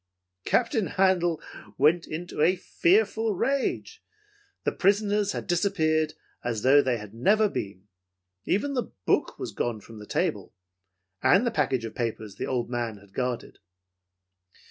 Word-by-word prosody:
"Captain 225 -4 +1
Handel 180 -4 +2 0.4
went 160 +5 +3
into 165 0 -5
a 175 +4 +5
fearful 210 +4 +2
rage. 280 - -1 0.6
The - - +1
prisoners 205 +1 +2
had - - -4
disappeared 160 -4 +1 0.3
as 115 -3 -2
though 140 +2 +7
they 130 -3 0
had 105 -1 -10
never 210 - +3
been. 100 - -6 0.6
Even 280 +9 0
the 250 -3 -2
book - - +1
was - - -5
gone 120 -3 -2
from 110 +1 -12
the 105 - -11
table, - - -2 0.7
and 185 - +4
the 240 - +1
package 130 - 0
of 110 - -6
papers 110 -4 -4
the - - -3
old 125 -2 -1
man 120 -3 -3
had 100 -1 -19
guarded. 125 -1 -3
160 Hz, 145 wpm, -27 LUFS, -, 0.7 s, though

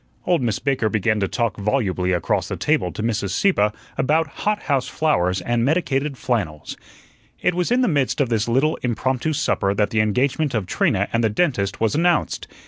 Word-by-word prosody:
Old 175 -5 +2
Miss 115 -4 0
Baker 135 -6 0
began 110 0 +1
to 100 - 0
talk 115 0 -1
volubly 100 -4 0
across 85 -3 0
the - - -4
table - - 0
to 110 - -5
Mrs. 105 -3 -1
Sieppe 145 - +2 0.3
about 155 +4 +2 0.2
hot 210 0 0
house 135 -3 0
flowers 95 - 0
and 120 +4 0
medicated 140 -2 0
flannels. 90 - -3 0.6
It 180 - +1
was 180 +4 -1
in 250 +1 +3
the 250 - +3
midst 145 -7 0
of 135 -4 +1
this 115 -2 0
little 135 +7 +2
impromptu 130 +4 -1
supper 100 -9 0
that 105 0 +1
the 110 - +1
engagement 130 +6 0
of 105 -4 -1
Trina - - +1
and 115 +1 +1
the 110 - +3
dentist 105 - 0
was 110 -2 +1
announced. 170 +1 +1
120 Hz, 190 wpm, -21 LUFS, 105-150 Hz, 0.6 s, in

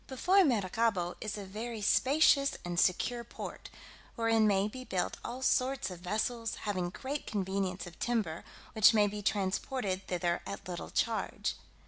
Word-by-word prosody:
Before 365 +9 +4
Maracaibo 210 - +1
is 215 -1 -3
a 200 - -6
very 220 +4 -5
spacious 275 +4 +4
and 175 0 -1
secure 235 +7 +2
port, 235 - -8 0.5
wherein 225 -2 +3
may 200 0 +3
be 255 +4 -7
built 185 -7 -2
all 255 +2 -5
sorts 255 -7 +1
of 180 - -8
vessels, 220 +5 -2
having 185 -4 -1
great 265 +9 -5
convenience 190 -2 -2
of 175 -2 -12
timber, 210 -10 -1 0.3
which 220 +1 +6
may 210 -1 +5
be 205 0 -3
transported 195 0 -1
thither 175 -1 0
at 200 - -6
little 175 -1 -5
charge. 230 -2 -1
210 Hz, 150 wpm, -32 LUFS, 185-240 Hz, 0.5 s, which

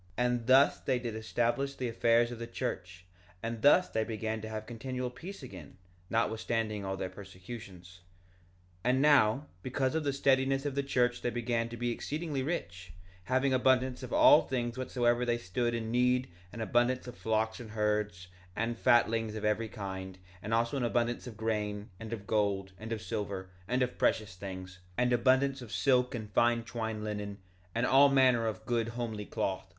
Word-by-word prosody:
1:28 125 - +2
And 120 -1 0
thus 135 +2 +6
they 130 -2 0
did 120 -2 -4
establish 120 +5 -1
the 125 - -3
affairs 115 +1 +3
of 120 - -7
the 115 - -5
church; 90 -5 -5 0.4
and 115 -1 -3
thus 165 +7 +6
they 110 - -1
began 110 0 -3
to 110 - -6
have 110 0 -5
continual 125 +2 -4
peace 170 +7 -9
again, 95 - -10 0.3
notwithstanding 110 -2 -1
all 95 0 -3
their 95 - -2
persecutions. 95 -2 -10 0.8
1:29 125 - +1
And 130 +1 +3
now, 140 -3 +5 0.2
because 130 +2 -1
of 160 -1 0
the 140 - +1
steadiness 135 0 +2
of 145 - -1
the 140 - 0
church 125 -3 +1
they - - 0
began 115 -1 -1
to 120 - -7
be 120 +1 -1
exceedingly 150 +3 -3
rich, 95 - -4 0.3
having 130 +3 +2
abundance 130 0 +2
of - - -7
all 305 0 +7
things 120 -2 -2
whatsoever 125 -2 +1
they 120 -1 +1
stood 120 +3 -1
in 110 -1 -3
need—an 120 -6 0
abundance 120 +4 +1
of 125 -1 -8
flocks 110 -1 -1
and 120 -3 -9
herds, 105 -3 -1 0.3
and 115 +1 -2
fatlings 115 -3 +3
of 110 - -4
every 110 +1 0
kind, 95 -3 -6 0.2
and 105 - -6
also 115 +4 +1
abundance 120 +1 0
of 115 -3 -9
grain, 105 -2 -2
and 115 0 -7
of 105 -3 -5
gold, 100 -3 0
and 110 +1 -7
of 110 -2 -3
silver, 95 -2 -4 0.2
and 125 +2 +1
of 125 - -4
precious 105 -4 +1
things, 95 -1 -8 0.2
and 125 0 +2
abundance 130 +3 +3
of 120 -3 -9
silk 125 0 +2
and 110 -3 -6
fine 120 +2 +3
twined 110 -1 -4
linen, 105 -1 -4 0.4
and 115 +2 +2
all 140 +2 +6
manner 130 -4 +4
of 110 0 -4
good 115 -1 0
homely 115 -3 -4
cloth. 95 -1 -2
115 Hz, 180 wpm, -31 LUFS, 105-125 Hz, 0.8 s, all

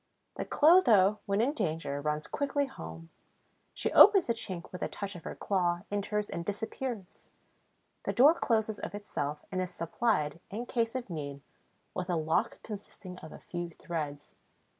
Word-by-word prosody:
The - - -3
Clotho, 230 - +5
when 200 +1 +2
in 265 +5 +2
danger, 160 - -2
runs 150 0 -1
quickly 285 0 0
home; 165 -10 -9 0.6
she - - -2
opens 395 -3 +8
the 235 - +1
chink 185 -6 -5
with 180 - -7
a - - 0
touch 200 -1 -5
of 175 - -10
her - - -5
claw, 175 -3 0
enters 205 +1 -1
and 170 - -4
disappears. 210 +1 -5 0.8
The - - +1
door 265 - +7
closes 220 -8 0
of - - -5
itself 150 -8 -4
and 185 -1 0
is 185 - -2
supplied, 170 -3 0
in 225 +5 -4
case 230 -1 -1
of 245 -7 -4
need, 140 -3 -5 0.5
with 180 0 -4
a 175 - +2
lock 160 0 0
consisting 195 -3 -9
of 155 - -10
a - - -9
few 175 -1 -5
threads. 150 -3 -5
195 Hz, 165 wpm, -31 LUFS, 165-230 Hz, 0.8 s, opens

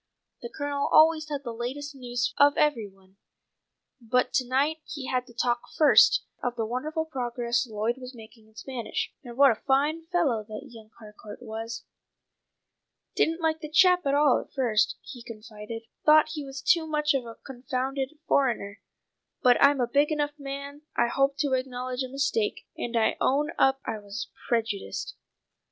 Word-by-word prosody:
The 235 - -6
Colonel 285 +1 -2
always 310 -1 +5
had 285 -2 -4
the 235 -3 -5
latest 270 +5 -5
news 245 -3 -2
of 285 0 +5
every 295 -8 +2
one, 195 0 -23 0.8
but 250 +2 +1
to 255 - +1
night 280 +5 +1
he 285 -3 -7
had 255 -1 -1
to 240 - -15
talk 240 0 0 0.2
first 305 -2 +6 0.2
of 245 -1 -2
the 225 -2 -2
wonderful 305 +8 -3
progress 240 -4 -2
Lloyd 220 +3 -2
was 255 0 -9
making 220 -1 -15
in 220 - -26
Spanish, 245 0 -4
and 240 -2 -10
what 280 -1 +7
a 220 - -4
fine 300 +5 +1
fellow 305 -11 +1
that 215 +6 -8
young 220 -2 -13
Harcourt 210 +1 -12
was. 225 0 -6 1.3
"Didn't 330 +2 +1
like 320 -1 +1
the 305 - -6
chap 360 0 +4
at 275 - +2
all 290 -3 +4
at - - -16
first," 240 -6 +1
he 250 -4 -10
confided. 220 0 -9 0.2
"Thought 310 0 +6
he 310 -2 -5
was 270 0 -8
too 335 -4 +3
much 300 -1 +1
of 260 -3 -2
a 230 - -9
confounded 265 +2 -4
foreigner; 230 -7 0 0.6
but 250 -2 +6
I'm 280 0 +5
a 245 - +2
big 285 +5 +2
enough 295 -1 -1
man 280 +1 -7 0.2
I 235 - +3
hope 275 +2 +1
to 285 -3 0
acknowledge 255 0 -2
a 260 - -3
mistake, 270 -6 -1
and 235 0 -3
I 225 - +2
own 295 +4 +2
up 270 0 +4
I 220 - -3
was 205 +1 -7 0.2
prejudiced." 220 -4 -2
260 Hz, 175 wpm, -27 LUFS, 235-290 Hz, 1.3 s, what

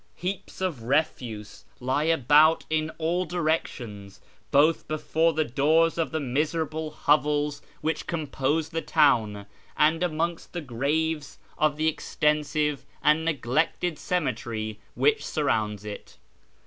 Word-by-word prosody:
Heaps 190 +1 -5
of 175 -10 -2
refuse 115 -5 -2 0.2
lie 130 +4 0
about 155 +1 +4
in 155 0 +1
all 170 +3 0
directions, 145 - -3 0.3
both 150 +4 +3
before 160 +2 +1
the 155 +1 +1
doors 160 +6 +2
of 165 - +1
the 160 - -2
miserable 155 +3 -1 0.2
hoN'els 145 0 +2 0.2
which 160 +1 -2
compose 155 -1 -1
the 165 -1 -2
town, 115 -12 +2 0.3
and 155 +2 +3
amon^^st 170 0 -2
the 175 - -3
f,a'aves 150 +4 -1 0.2
of 150 -1 +1
the 155 +1 +1
extensive 150 -1 0 0.2
and 150 +2 +4
neglected 155 +3 0
cemetery 115 -10 -2 0.2
which 440 0 +2
surrounds 105 - -1
it. 105 -1 -8
150 Hz, 120 wpm, -26 LUFS, 135-160 Hz, 0.3 s, about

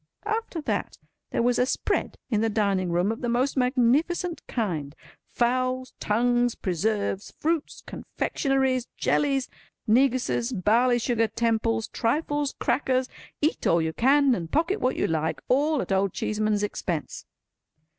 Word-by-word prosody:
After 435 -6 -2
that, - - -2 0.3
there - - 0
was 245 0 +2
a 250 - +4
spread - - -1
in 215 -2 +2
the 225 - +2
dining 200 -4 0
room 175 +5 +1
of 225 - -6
the 240 - -1
most 250 +4 +1
magnificent 275 +8 +1
kind. 160 - -3 0.3
Fowls, 255 +1 0
tongues, 240 +2 +1
preserves, 200 +2 -1
fruits, 320 -1 -2
confectionaries, 265 -3 -1
jellies, 275 -3 +1 0.4
neguses, 250 +1 +2
barley 235 +5 +3
sugar 235 -1 +1
temples, 225 -1 0
trifles, 290 +3 -1
crackers—eat 260 +3 -1
all 170 - +4
you 160 0 -1
can 275 - +4
and 170 -7 -3
pocket 335 +7 +1
what 255 - +1
you - - 0
like—all 255 - 0
at - - -8
Old 195 -1 +1
Cheeseman's 215 -1 0
expense. 175 -6 -4
240 Hz, 130 wpm, -26 LUFS, 210-270 Hz, 0.4 s, a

